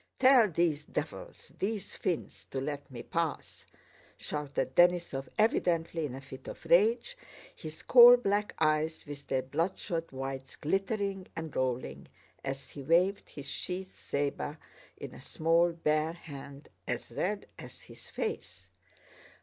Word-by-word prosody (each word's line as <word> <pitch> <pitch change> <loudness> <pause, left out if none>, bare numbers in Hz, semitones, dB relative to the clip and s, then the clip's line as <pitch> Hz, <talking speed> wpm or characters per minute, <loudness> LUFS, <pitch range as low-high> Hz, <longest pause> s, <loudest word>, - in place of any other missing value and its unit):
"Tell 255 -4 +6
these 160 -3 +1
devils, 150 +1 -6
these 205 0 -2
fiends, 175 - -3
to 135 - -3
let 145 +1 -4
me 120 -3 -8
pass!" 165 -2 -3 0.5
shouted 150 -1 -3
Denísov 175 -6 +3
evidently 170 -7 +2
in 130 - -7
a 135 - -8
fit 130 -1 -11
of - - -8
rage, 230 - +4 0.4
his 155 0 -9
coal 245 0 +10
black 205 -3 0
eyes 155 0 +1
with 145 -1 -9
their 130 -1 0
bloodshot 165 +3 -2
whites 135 0 -5
glittering 195 +3 -1
and 160 -2 -6
rolling 130 -1 -2 0.4
as 135 0 -5
he 140 - -8
waved 175 +7 +2
his 140 -2 -9
sheathed 185 +6 -5
saber 145 +1 -3 0.4
in - - -8
a - - -11
small 165 +2 +2
bare 155 -1 +1
hand 140 -3 -10 0.2
as - - -3
red 205 +2 -2
as - - -11
his - - -14
face. 455 -1 -5
165 Hz, 135 wpm, -31 LUFS, 140-190 Hz, 0.5 s, coal